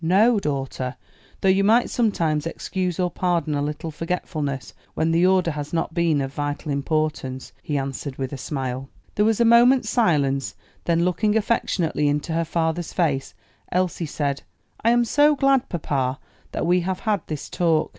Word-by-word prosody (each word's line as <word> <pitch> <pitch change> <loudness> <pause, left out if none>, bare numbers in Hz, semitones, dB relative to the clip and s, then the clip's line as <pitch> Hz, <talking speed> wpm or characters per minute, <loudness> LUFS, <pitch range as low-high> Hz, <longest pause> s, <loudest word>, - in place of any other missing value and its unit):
"No, 205 +7 +4
daughter; 135 -5 -3 0.5
though 190 - +3
you 190 +1 +4
might 225 +4 +4
sometimes 165 -9 +1
excuse 180 +1 -3
or 180 -1 +1
pardon 170 -5 0
a 145 - 0
little 150 +2 -3
forgetfulness 155 -4 -3 0.2
when 160 +1 +1
the 170 +2 +4
order 185 -3 +3
has 145 0 -6
not 165 -1 -1
been 165 -4 +2
of 135 0 -4
vital 145 +1 -3
importance," 140 -2 -2
he 145 - -2
answered, 135 0 -4
with 135 0 -4
a - - -2
smile. 130 -1 -4 0.2
There 210 - +2
was 220 0 +2
a 235 - +4
moment's 235 0 +5
silence: 140 - +1 0.3
then 170 0 +2
looking 210 +4 +1
affectionately 185 -8 0
into 150 +3 -1
her 165 0 0
father's 165 +1 -1
face, 145 -7 0 0.4
Elsie 180 -2 0
said, 140 -1 -2 0.4
"I 230 - +4
am 240 0 +4
so 295 +5 +4
glad, 275 -2 +2
papa, 135 -6 -1 0.3
that - - -2
we 180 +2 +3
have 185 +1 -3
had 210 -4 0
this 155 -3 -5
talk. 165 -3 +1
165 Hz, 170 wpm, -23 LUFS, 145-190 Hz, 0.5 s, moment's